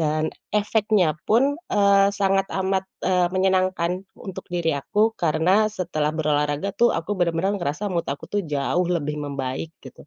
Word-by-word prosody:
Dan, 155 Hz, 0 st, 0 dB, 0.2 s
efeknya 210 Hz, -5 st, +2 dB, 0.2 s
pun, 275 Hz, +8 st, +3 dB
eee, 200 Hz, -1 st, +4 dB
sangat 195 Hz, -1 st, +1 dB
amat, 190 Hz, 0 st, 0 dB, 0.2 s
eee, 180 Hz, -1 st, +2 dB
menyenangkan 185 Hz, -1 st, +1 dB, 0.2 s
untuk 190 Hz, -1 st, -8 dB
diri 170 Hz, -2 st, 0 dB
aku, 210 Hz, +10 st, +1 dB
karena 180 Hz, +4 st, +2 dB
setelah 170 Hz, -7 st, -2 dB
berolahraga 150 Hz, +4 st, 0 dB
tuh 240 Hz, 0 st, +3 dB
aku 165 Hz, +5 st, -3 dB
benar-benar 175 Hz, +3 st, +1 dB
ngerasa 155 Hz, +6 st, -2 dB
mood 170 Hz, -1 st, -2 dB
aku 140 Hz, -, -4 dB
tuh 205 Hz, -, +1 dB
jauh 150 Hz, +5 st, 0 dB
lebih 150 Hz, -2 st, -2 dB
membaik, 140 Hz, +3 st, -4 dB
gitu. 130 Hz, +2 st, -13 dB
180 Hz, 150 wpm, -23 LUFS, 155-200 Hz, 0.2 s, eee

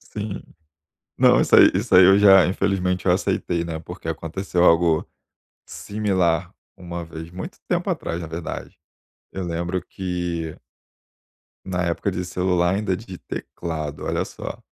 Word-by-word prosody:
Sim. 105 Hz, -1 st, -6 dB, 0.8 s
Não, -, -, +5 dB
isso -, -, +4 dB
aí -, -, +9 dB
isso 100 Hz, +3 st, -1 dB
aí 90 Hz, -, +9 dB
eu 95 Hz, +1 st, +7 dB
já, 95 Hz, -2 st, +7 dB
infelizmente, 90 Hz, -1 st, 0 dB
eu -, -, +4 dB
aceitei, 85 Hz, -1 st, 0 dB
né, 80 Hz, -1 st, -5 dB
porque 85 Hz, +1 st, -9 dB
aconteceu 85 Hz, +3 st, -2 dB
algo 85 Hz, -2 st, +4 dB, 0.6 s
similar 95 Hz, -4 st, -1 dB, 0.2 s
uma 85 Hz, -2 st, -6 dB
vez, 80 Hz, 0 st, -9 dB
muito 90 Hz, +2 st, -8 dB
tempo -, -, 0 dB
atrás, 85 Hz, +1 st, -3 dB
na 85 Hz, -, -5 dB
verdade. 80 Hz, +1 st, -7 dB, 0.5 s
Eu 95 Hz, -, -5 dB
lembro 85 Hz, +2 st, -2 dB
que 90 Hz, -3 st, -4 dB, 1.1 s
na 90 Hz, -1 st, -2 dB
época 85 Hz, +3 st, -1 dB
de 90 Hz, 0 st, -3 dB
celular 90 Hz, 0 st, +1 dB
ainda 100 Hz, -2 st, 0 dB
de 95 Hz, -3 st, -9 dB
teclado, 80 Hz, -5 st, -6 dB
olha -, -, 0 dB
só. -, -, -8 dB
90 Hz, 140 wpm, -23 LUFS, 85-95 Hz, 1.1 s, aí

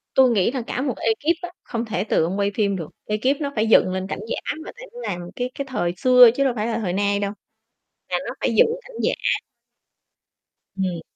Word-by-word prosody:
Tui 260 Hz, -1 st, +6 dB
nghĩ 210 Hz, -3 st, +2 dB
là 260 Hz, -1 st, -2 dB
cả 250 Hz, -, -2 dB
một 265 Hz, -4 st, -1 dB
ekip 290 Hz, +10 st, +1 dB
á, 355 Hz, -, -5 dB
không 235 Hz, -2 st, -3 dB
thể 205 Hz, -4 st, -2 dB
từ 205 Hz, -, +2 dB
ông 190 Hz, +5 st, -2 dB
quay 200 Hz, 0 st, +1 dB
phim 200 Hz, -3 st, +1 dB
được, 165 Hz, -5 st, -5 dB, 0.2 s
ekip 255 Hz, +8 st, 0 dB
nó 285 Hz, -1 st, -2 dB
phải 220 Hz, 0 st, +1 dB
dựng 200 Hz, -4 st, +5 dB
lên 190 Hz, 0 st, -3 dB
cảnh -, -, -4 dB
giả -, -, -3 dB
mà, -, -, -7 dB
tại -, -, -11 dB
nó 485 Hz, -, -9 dB
làm 180 Hz, -, -3 dB, 0.2 s
cái 250 Hz, +1 st, -3 dB
cái 280 Hz, -, -3 dB
thời 175 Hz, -10 st, -1 dB
xưa 250 Hz, +2 st, +8 dB
chứ 275 Hz, -, +2 dB
đâu 265 Hz, -2 st, +2 dB
phải 215 Hz, 0 st, -1 dB
là 225 Hz, -1 st, -1 dB
thời 185 Hz, -5 st, -2 dB
nay 200 Hz, +1 st, +1 dB
đâu, 200 Hz, -1 st, -1 dB, 0.8 s
là -, -, +1 dB
nó -, -, -4 dB
phải -, -, 0 dB
dựng 485 Hz, -, +6 dB, 0.2 s
cảnh -, -, -13 dB
giả. -, -, +2 dB, 1.6 s
Ừm. 185 Hz, -3 st, -1 dB
225 Hz, 230 wpm, -23 LUFS, 195-265 Hz, 1.6 s, xưa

